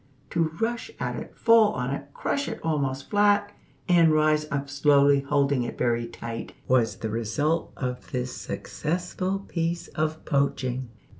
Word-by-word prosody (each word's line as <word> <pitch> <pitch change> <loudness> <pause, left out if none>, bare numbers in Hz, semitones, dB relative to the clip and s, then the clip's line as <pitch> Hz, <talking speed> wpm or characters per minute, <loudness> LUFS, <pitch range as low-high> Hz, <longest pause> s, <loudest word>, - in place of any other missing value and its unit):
To 170 -1 +2
rush 235 - -1
at - - -2
it, - - -8
fall 230 -2 +5
on 125 +1 -2
it, 140 0 -4
crush 280 - -2
it 225 - -4
almost 140 -4 -1
flat, 205 0 +3 0.4
and 170 -3 +5
rise 155 0 +3
up 140 0 -2
slowly 140 0 +4
holding 140 -1 +1
it 120 - -4
very 120 -1 +1
tight, 115 0 -7
was 115 -5 +3
the 110 - -4
result 145 +9 0
of 125 -1 -4
this 125 0 -3
successful 185 +4 -3
piece 170 0 -2
of 155 0 -2
poaching. 130 -3 0
145 Hz, 150 wpm, -26 LUFS, 130-170 Hz, 0.4 s, fall